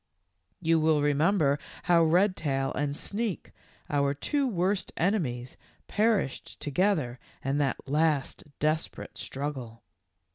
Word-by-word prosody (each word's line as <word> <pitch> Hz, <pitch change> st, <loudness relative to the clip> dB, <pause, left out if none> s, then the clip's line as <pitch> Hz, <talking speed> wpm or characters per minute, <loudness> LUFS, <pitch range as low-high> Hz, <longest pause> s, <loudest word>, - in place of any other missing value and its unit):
" 90 Hz, -, -47 dB
You 165 Hz, 0 st, +5 dB
will 155 Hz, -2 st, +3 dB
remember 145 Hz, 0 st, +3 dB, 0.2 s
how 170 Hz, -2 st, +5 dB
Redtail 160 Hz, -6 st, +2 dB
and 145 Hz, +1 st, -1 dB
Sneak, 210 Hz, -2 st, -3 dB, 0.4 s
our 140 Hz, -1 st, +1 dB
two 280 Hz, -, 0 dB
worst 190 Hz, -2 st, 0 dB
enemies, 140 Hz, -, -1 dB, 0.3 s
perished 210 Hz, -, 0 dB
together 145 Hz, -5 st, 0 dB, 0.3 s
in 135 Hz, +2 st, +1 dB
that 140 Hz, -2 st, -1 dB
last 150 Hz, 0 st, +1 dB
desperate 155 Hz, +1 st, -2 dB
struggle. 130 Hz, -5 st, -5 dB
150 Hz, 110 wpm, -28 LUFS, 140-180 Hz, 0.4 s, You